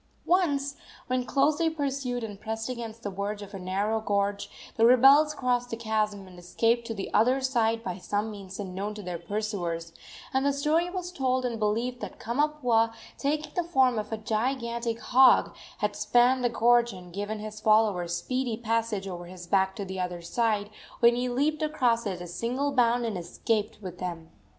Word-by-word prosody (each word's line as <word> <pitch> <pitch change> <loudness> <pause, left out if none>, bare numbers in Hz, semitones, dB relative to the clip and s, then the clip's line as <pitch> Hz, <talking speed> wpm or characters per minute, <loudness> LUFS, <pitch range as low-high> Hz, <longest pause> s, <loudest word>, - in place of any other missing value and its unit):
Once, 285 -6 +1 0.3
when 255 0 0
closely 300 +5 +2
pursued 275 -5 -2
and 205 -3 -7
pressed 225 +2 -4
against 230 -2 -6
the 205 - -2
verge 205 +2 -4
of 200 +1 -12
a 195 - -6
narrow 200 +4 -1
gorge, 200 -1 -1 0.3
the 225 - +2
rebels 270 +5 +6
crossed 245 -2 0
the 230 - -4
chasm 215 -3 -1
and 180 -1 -13
escaped 230 +6 +1
to 225 - -3
the 195 - -5
other 250 +6 +4
side 230 -4 +1
by 185 -3 -4
some 205 +4 -2
means 195 -2 -9
unknown 200 +2 -4
to 210 - -8
their 175 -2 -4
pursuers, 175 -4 -3 0.4
and 265 0 +2
the 280 - +3
story 310 +5 +1
was 360 -1 -5
told 260 -5 0
and 235 -2 -2
believed 230 +4 0
that - - -7
Kamapuaa, 240 -3 +1 0.3
taking 300 +2 -1
the 355 - +1
form 265 -8 +3
of 210 - -6
a 220 - -1
gigantic 235 +1 -2
hog, 255 +1 +5 0.2
had 210 -1 -1
spanned 250 +1 +3
the 245 - +3
gorge 235 0 +3
and 180 -2 -11
given 205 +3 -3
his 215 0 -7
followers 210 -6 +3
speedy 255 +3 -2
passage 225 -3 -1
over 175 -2 -6
his 180 0 -10
back 190 +1 +2
to 200 - -4
the 190 0 -6
other 180 -1 -3
side, 210 +2 0 0.3
when 235 0 +6
he 250 +1 -1
leaped 290 +5 0
across 250 -7 +1
at 185 -3 -4
a - - -5
single 250 +10 -2
bound 240 -2 +2
and 210 -5 -2
escaped 215 +5 -2
with 180 -2 -7
them. 170 -3 -5
225 Hz, 185 wpm, -28 LUFS, 200-255 Hz, 0.4 s, rebels